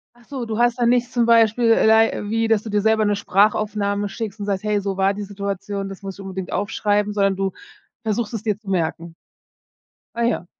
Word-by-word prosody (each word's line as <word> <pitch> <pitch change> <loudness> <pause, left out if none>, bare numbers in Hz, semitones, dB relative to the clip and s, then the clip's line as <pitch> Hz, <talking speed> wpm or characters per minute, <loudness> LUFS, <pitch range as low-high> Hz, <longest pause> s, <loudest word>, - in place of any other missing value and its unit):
Achso, 240 +1 -7
du 220 -1 -4
hast 240 0 +2
da 240 - +2
nichts 245 0 +2
zum 240 -2 +2
Beispiel 230 0 +4
lei 220 0 +4
wie, 225 +1 +1
dass 220 -2 +2
du 220 - -7
dir 205 0 +1
selber 220 0 +2
'ne 205 - +2
Sprachaufnahme 205 0 +1
schickst 220 0 -6
und 205 - -4
sagst: 195 -1 -1
„Hey, 210 -1 0
so 195 -1 -3
war 195 +1 +2
die 205 - -6
Situation, 200 0 -4
das 195 -1 -9
muss 195 -1 -7
ich - - -9
unbedingt 190 -1 -6
aufschreiben." 205 +1 0
Sondern 195 -2 +2
du 195 0 -1 0.5
versuchst 225 +1 -2
es 225 - -3
dir 210 -3 0
zu 205 -3 -12
merken. 165 -2 -2 1.0
Ah 235 - -1
ja. 230 -6 0
205 Hz, 210 wpm, -21 LUFS, 195-225 Hz, 1.0 s, Beispiel